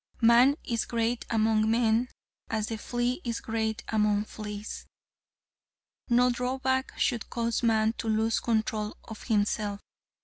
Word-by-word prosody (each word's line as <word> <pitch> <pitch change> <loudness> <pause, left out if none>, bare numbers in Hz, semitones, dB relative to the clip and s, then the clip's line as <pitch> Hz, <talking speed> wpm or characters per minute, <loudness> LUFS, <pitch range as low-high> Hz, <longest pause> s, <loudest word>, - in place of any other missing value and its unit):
Man 240 +4 +6
is 230 -2 -1
great 235 +1 -1
among 220 -1 +2
men 230 +1 +2 0.4
as 220 -1 -1
the 225 - -3
flea 245 +6 -1
is 235 -2 -2
great 220 -1 -2
among 210 -1 +2
fleas. 210 0 -7 1.2
No 245 +1 +4
drawback 260 +2 -1
should 235 -4 0
cause 235 -1 -1
man 220 -2 +2
to - - -3
lose 220 +1 +1
control 220 -2 -1
of 220 - -10
himself. 205 -2 0
225 Hz, 130 wpm, -28 LUFS, 215-240 Hz, 1.2 s, Man